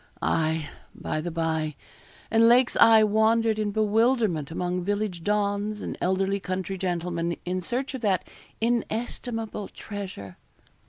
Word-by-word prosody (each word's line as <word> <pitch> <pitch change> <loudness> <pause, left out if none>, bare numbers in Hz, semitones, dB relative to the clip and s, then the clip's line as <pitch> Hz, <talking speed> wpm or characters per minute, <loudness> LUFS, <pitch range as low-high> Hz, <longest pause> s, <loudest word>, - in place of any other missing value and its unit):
Aye, 160 -1 +1 0.3
by 155 - -3
the 175 - -3
bye, 160 -2 -1 0.6
and 225 0 +5
Lake's 245 +1 +5
eye 225 -1 +7
wandered 220 +1 +3
in 210 -1 0
bewilderment 215 - +2
among 180 +2 -2
village 205 -3 -2
dons 205 +1 0
and - - -4
elderly 190 +2 +1
country 185 0 -3
gentlemen, 170 -2 -2
in 185 +1 -2
search 255 - -2
of 260 - -5
that 195 -5 +1 0.3
inestimable 225 -2 -2
treasure. 190 - -8
200 Hz, 125 wpm, -26 LUFS, 175-220 Hz, 0.6 s, eye